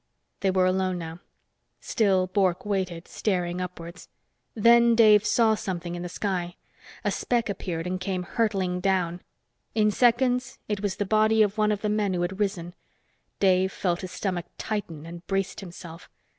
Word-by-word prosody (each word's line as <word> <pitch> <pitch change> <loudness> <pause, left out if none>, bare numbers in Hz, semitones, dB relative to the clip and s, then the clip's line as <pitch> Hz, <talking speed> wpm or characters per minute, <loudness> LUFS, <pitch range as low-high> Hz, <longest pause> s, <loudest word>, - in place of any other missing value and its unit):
They 195 - +1
were 185 -1 +3
alone 185 0 +1
now. 165 0 -7 0.6
Still 195 -4 +2
Bork 185 -1 0
waited, 185 -4 -2
staring 180 -3 -1
upwards. 180 -1 -8 0.5
Then 235 +1 +5
Dave 215 -2 +6
saw 225 -2 +4
something 175 -4 -4
in 175 - -5
the 175 - -5
sky. 180 -2 -3 0.5
A - - +1
speck 240 -2 0
appeared 175 -3 -4
and 185 +1 -3
came 185 -1 -2
hurtling 190 -3 -1
down. 180 -2 0 0.5
In 215 -1 +3
seconds, 250 +2 +2
it 210 -2 -2
was 200 -2 -1
the 205 - -2
body 215 +2 +4
of 205 -1 -1
one 215 0 +3
of 205 -1 -2
the 215 - -1
men 210 -3 0
who 175 - 0
had 190 +3 -3
risen. 175 -4 -2 0.7
Dave 190 -1 +3
felt 175 -3 -1
his 185 - -6
stomach 185 -4 -3
tighten 170 -8 -4
and 170 +1 -9
braced 195 0 -1
himself. 170 -2 -10
190 Hz, 165 wpm, -26 LUFS, 180-210 Hz, 0.7 s, Dave